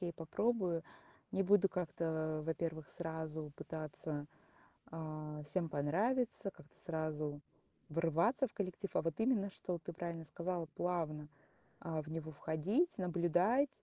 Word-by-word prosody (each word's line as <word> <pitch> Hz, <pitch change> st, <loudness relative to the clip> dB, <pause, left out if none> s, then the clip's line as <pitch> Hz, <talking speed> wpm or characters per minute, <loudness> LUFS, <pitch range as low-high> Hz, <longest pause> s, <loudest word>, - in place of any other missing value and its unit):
я 175 Hz, -, -1 dB
и -, -, -3 dB
попробую. 175 Hz, 0 st, +1 dB, 0.5 s
Не 195 Hz, -, +3 dB
буду 195 Hz, 0 st, +6 dB
как-то, 160 Hz, -3 st, 0 dB
во-первых, 160 Hz, -2 st, -1 dB
сразу 160 Hz, -2 st, -3 dB
пытаться, 155 Hz, -1 st, -4 dB, 0.6 s
а, 155 Hz, -1 st, -4 dB
всем 170 Hz, +1 st, 0 dB
понравиться, 200 Hz, -, +2 dB
как-то 150 Hz, -, -17 dB
сразу 155 Hz, -3 st, -1 dB, 0.5 s
врываться 165 Hz, -, +3 dB
в -, -, -13 dB
коллектив, 195 Hz, 0 st, -2 dB
а -, -, +4 dB
вот 165 Hz, +4 st, -1 dB
именно, 220 Hz, -5 st, +3 dB
что, 180 Hz, -2 st, -3 dB
ты 170 Hz, +1 st, -6 dB
правильно 170 Hz, -1 st, -3 dB
сказала, 170 Hz, +3 st, -2 dB
плавно, 155 Hz, -4 st, 0 dB, 0.5 s
а, 160 Hz, -1 st, -1 dB
в 155 Hz, -, -10 dB
него 160 Hz, 0 st, -3 dB
входить, 185 Hz, -, +2 dB
наблюдать, 180 Hz, -, +4 dB
165 Hz, 130 wpm, -38 LUFS, 155-185 Hz, 0.6 s, буду